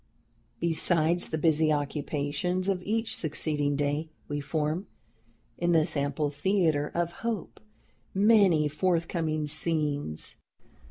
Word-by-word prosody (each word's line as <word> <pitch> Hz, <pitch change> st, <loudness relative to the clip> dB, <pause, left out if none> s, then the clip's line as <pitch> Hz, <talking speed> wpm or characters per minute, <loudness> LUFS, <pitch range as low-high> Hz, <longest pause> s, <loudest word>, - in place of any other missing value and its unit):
"Besides 170 Hz, 0 st, +2 dB
the 160 Hz, -, -2 dB
busy 155 Hz, 0 st, +3 dB
occupations 150 Hz, +4 st, -2 dB
of 190 Hz, -2 st, 0 dB
each 225 Hz, +4 st, -1 dB
succeeding 150 Hz, -2 st, -1 dB
day, 145 Hz, +2 st, -1 dB, 0.2 s
we 145 Hz, 0 st, -3 dB
form, 155 Hz, +5 st, -2 dB, 0.7 s
in 175 Hz, 0 st, +2 dB
this 160 Hz, 0 st, +3 dB
ample 145 Hz, +1 st, -1 dB
theatre 155 Hz, -1 st, +1 dB
of 170 Hz, 0 st, 0 dB
hope, 230 Hz, -3 st, -4 dB, 0.5 s
many 195 Hz, -7 st, +4 dB
forthcoming 165 Hz, -1 st, -1 dB
scenes. 150 Hz, -, 0 dB
155 Hz, 105 wpm, -28 LUFS, 145-175 Hz, 0.7 s, many